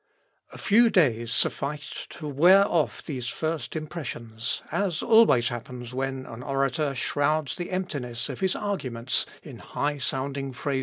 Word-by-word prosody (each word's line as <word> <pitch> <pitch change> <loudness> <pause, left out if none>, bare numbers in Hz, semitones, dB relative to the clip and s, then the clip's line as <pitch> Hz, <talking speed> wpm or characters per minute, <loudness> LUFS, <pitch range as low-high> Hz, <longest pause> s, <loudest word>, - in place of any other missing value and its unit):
A - - -10
few 230 +2 +5
days 120 - +2
sufficed 145 +5 -2
to 155 - -7
wear 180 +8 +6
off 165 -3 0
these 130 -5 -4
first 160 +4 -3
impressions, 125 -8 -4
as 190 -6 0
always 220 - +6
happens 120 0 -7
when 130 0 -2
an 115 +1 -8
orator 135 +2 0
shrouds 145 +2 0
the 175 - -5
emptiness 140 -10 -3
of 135 -4 -6
his 190 -1 +1
arguments 130 - -1 0.2
in - - -10
high 145 0 -2
sounding 135 0 -2
phrases. 140 +1 -1
140 Hz, 145 wpm, -26 LUFS, 125-165 Hz, 0.2 s, wear